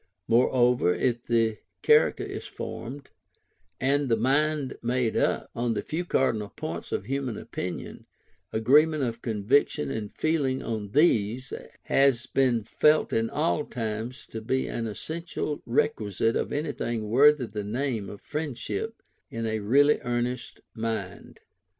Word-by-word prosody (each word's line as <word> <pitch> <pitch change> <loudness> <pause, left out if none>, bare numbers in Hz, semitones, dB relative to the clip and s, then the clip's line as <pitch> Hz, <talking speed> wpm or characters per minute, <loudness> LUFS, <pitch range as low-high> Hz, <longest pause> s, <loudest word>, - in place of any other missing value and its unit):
Moreover, 120 -4 +3
if 120 -1 0
the 115 -3 +2 0.2
character - - +4
is - - -6
formed, 130 +4 -7 0.7
and 140 +1 +1
the 115 - +3
mind 140 +3 +1
made 120 -1 0
up, - - 0
on 120 -1 0
the 105 - -2
few 170 +3 -3
cardinal 110 -10 +1
points - - -5
of - - -2
human 135 -4 -2
opinion, - - -6 0.4
agreement 145 +7 +4
of 120 -2 -3
conviction 110 - +1
and 105 +3 -4
feeling 140 -5 0
on 110 -3 -4
these, 130 -4 +2 0.3
has 135 -4 +3
been 125 -4 +2
felt 150 +8 +3
in 115 0 +1
all 150 0 0
times 115 +1 -5
to 110 - -5
be 130 +4 0
an 115 -1 -3
essential 160 +5 -4
requisite 115 -4 +1
of - - -1
anything 120 -7 -2
worthy 140 +4 +5
the 105 -1 -5
name 115 -1 -2
of 100 - -10
friendship, 155 - -4 0.3
in 115 0 -4
a 110 -1 -1
really 140 +8 +4
earnest 120 +1 -3
mind. 115 -1 -5
120 Hz, 135 wpm, -27 LUFS, 110-140 Hz, 0.7 s, worthy